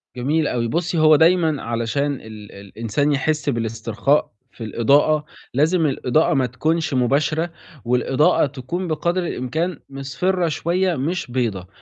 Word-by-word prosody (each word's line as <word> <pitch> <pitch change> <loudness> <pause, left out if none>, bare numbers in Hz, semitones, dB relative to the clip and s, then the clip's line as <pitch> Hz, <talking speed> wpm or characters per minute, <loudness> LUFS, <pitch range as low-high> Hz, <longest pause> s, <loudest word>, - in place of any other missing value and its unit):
جميل 150 +5 0
أوي. 115 -1 -1
بُصّي، 170 +5 -1
هو 155 0 +6
دايمًا 160 -2 +3
علشان 120 +5 -1
ال - - -8
ال 110 -2 -11
الإنسان 115 +8 -2
يحِس 150 +1 0
بالاسترخاء 115 +3 0 0.2
في 115 - -10
الإضاءة، 145 +7 +2 0.3
لازم 160 +5 +2
الإضاءة 140 +2 +1
ما 135 -3 +2
تكونش 155 +5 -1
مباشرة 145 +6 +1 0.4
والإضاءة 130 +5 +2
تكون 145 +7 -5
بقدر 170 +2 -1
الإمكان 160 +6 -3
مِصْفِرة 165 +7 -1
شوية 175 +3 0
مش 145 0 -3
بيضا. 110 -8 -2
145 Hz, 130 wpm, -21 LUFS, 125-160 Hz, 0.4 s, هو